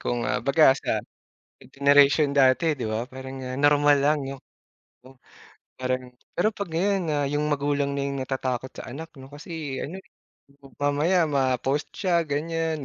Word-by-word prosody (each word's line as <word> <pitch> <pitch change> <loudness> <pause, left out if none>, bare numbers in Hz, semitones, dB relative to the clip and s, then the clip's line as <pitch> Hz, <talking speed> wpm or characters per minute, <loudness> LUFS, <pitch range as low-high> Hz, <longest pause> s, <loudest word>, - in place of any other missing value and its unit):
kumbaga 135 +4 +3
sa - - -10 0.7
sa - - -19
generation 140 +1 +5
dati, 140 +3 +4
'di 125 - -4
ba, 115 +3 -3
parang, 130 0 -8
ah, 130 0 -5
normal 145 0 +4
lang 150 +1 +3
no 135 - -5 0.7
'no? 130 +1 -17 0.6
Parang 130 0 -1 0.3
pero 215 +5 +2
pag 200 -3 -5
ngayon 195 +5 0
na 155 - 0 0.2
yung 150 +1 0
magulang 145 -1 0
na 140 - -1
yung 140 -1 -3
natatakot 130 -1 -3
sa - - -8
anak, 160 +4 -7
'no? 135 +1 -13
Kasi 150 -2 -6
ano, 165 +6 -5
eh, 190 0 -12 0.5
mam 135 -2 -16
mamaya 150 +5 +2
ma-post 135 0 0
siya 175 -4 +2
ganyan, 160 0 -2
145 Hz, 160 wpm, -25 LUFS, 130-155 Hz, 0.7 s, generation